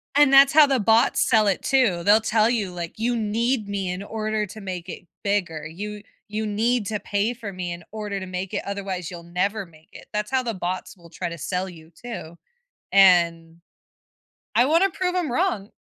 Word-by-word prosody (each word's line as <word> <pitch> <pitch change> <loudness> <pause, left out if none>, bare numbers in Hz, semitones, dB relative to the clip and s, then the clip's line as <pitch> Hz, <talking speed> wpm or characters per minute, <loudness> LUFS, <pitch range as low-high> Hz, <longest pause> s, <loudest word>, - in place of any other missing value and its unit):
And 290 -1 +6
that's 275 0 +7
how 300 -1 +8
the 270 -3 +1
bots 225 +4 +3
sell 215 -2 +4
it 195 - 0
too. 235 -11 +2
They'll 210 +4 +5
tell 220 0 +2
you, 210 -6 -1
like, 175 +3 -7
"You 240 +2 0
need 225 +1 0
me 195 -2 -3
in 180 +2 -5
order 215 0 -2
to 215 +2 -11
make 185 -2 -6
it 180 0 -9 0.2
bigger. 185 -6 -1
You 205 +6 -7 0.2
you 215 +1 -3
need 220 +2 0
to 210 -2 -2
pay 205 +4 -1
for 225 -4 -7
me 180 -1 -4
in 170 0 -7
order 210 -2 -4
to 185 - -6
make 185 0 -5
it, - - -2
otherwise 195 -3 -4
you'll 170 -2 -9
never 195 +5 -2
make 160 -2 -21
it." - - -13
That's 210 +1 -2
how 260 -1 +1
the 230 - -2
bots 185 +1 -4
will 170 -1 -16
try 175 +1 -4
to 170 - -7
sell 185 +4 -2
you 160 -2 -14
too, 170 -6 -9 0.5
and 170 -3 +4 0.9
I 245 - +5
wanna 335 +6 +3
prove 360 +1 -2
'em 350 -7 -1
wrong. 245 - 0
205 Hz, 205 wpm, -24 LUFS, 180-230 Hz, 0.9 s, how